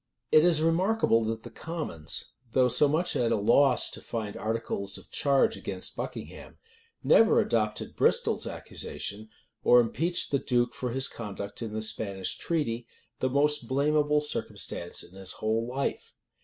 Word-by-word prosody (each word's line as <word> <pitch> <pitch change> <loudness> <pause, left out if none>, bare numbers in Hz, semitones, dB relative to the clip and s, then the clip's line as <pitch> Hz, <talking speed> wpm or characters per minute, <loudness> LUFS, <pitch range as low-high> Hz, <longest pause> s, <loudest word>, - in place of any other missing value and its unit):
It 155 - +7
is 165 -3 +3
remarkable 165 - +2
that 110 0 -3
the 120 - -10
commons, 135 - -3 0.2
though 130 -1 +4
so 145 - +5
much 160 +5 0
at 120 -2 +1
a - - +3
loss 125 +6 +4
to - - -8
find 110 -3 -5
articles 110 -3 -3
of - - -16
charge 140 +11 +2
against - - -5
Buckingham, - - -7 0.5
never 225 0 +5
adopted 110 - -1
Bristol's - - +2
accusation, 110 +2 -6 0.3
or 125 - +7
impeached 165 +9 0
the 140 - +2
duke 120 -2 +1
for 125 - -4
his 130 +2 +1
conduct 100 -2 -7
in 110 -2 -5
the 110 0 -2
Spanish 100 -4 -1
treaty, 120 -8 -2 0.3
the 130 - +1
most 140 -2 +2
blamable 150 +2 +2
circumstance 85 -10 -4
in - - -15
his 95 -1 -7
whole 110 +2 -1
life. 135 +3 -3
125 Hz, 155 wpm, -28 LUFS, 110-150 Hz, 0.5 s, It